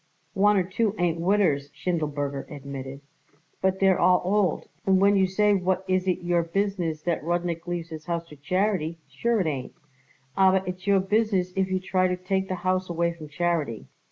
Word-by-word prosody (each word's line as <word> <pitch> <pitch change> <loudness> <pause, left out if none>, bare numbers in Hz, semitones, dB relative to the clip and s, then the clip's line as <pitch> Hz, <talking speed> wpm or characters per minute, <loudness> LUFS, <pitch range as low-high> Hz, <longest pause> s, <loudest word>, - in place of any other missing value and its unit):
"One 205 +1 +4
or 185 - +3
two 200 +3 -1
ain't 170 -1 0
widders," 170 -7 +2
Schindelberger 145 -5 -2
admitted, 140 -1 -7 0.6
"but 190 0 +1
they're 190 -1 +4
all 180 0 +4
old, 195 -2 +1 0.2
and 190 -1 +3
when 200 +1 +5
you 190 -1 +3
say 205 +2 +3
what 185 -1 0
is 185 0 +1
it 180 -1 0
your 175 0 +2
business 170 -3 -2
that 170 -4 -1
Rudnik 170 0 -2
leaves 175 -1 -3
his 155 -2 -8
house 170 -1 -2
to 150 - -11
charity, 180 +1 -1
sure 220 - 0
it - - -1
ain't. 135 -5 -3 0.6
Aber 190 0 +4
it's 185 +1 -6
your 200 -1 +4
business 195 -2 +1
if 190 0 +1
you 185 0 0
try 185 0 +1
to 180 0 -1
take 190 +1 -1
the 185 - -2
house 185 0 +1
away 170 0 0
from 160 -2 -10
charity. 155 -7 -1
180 Hz, 185 wpm, -26 LUFS, 165-190 Hz, 0.6 s, when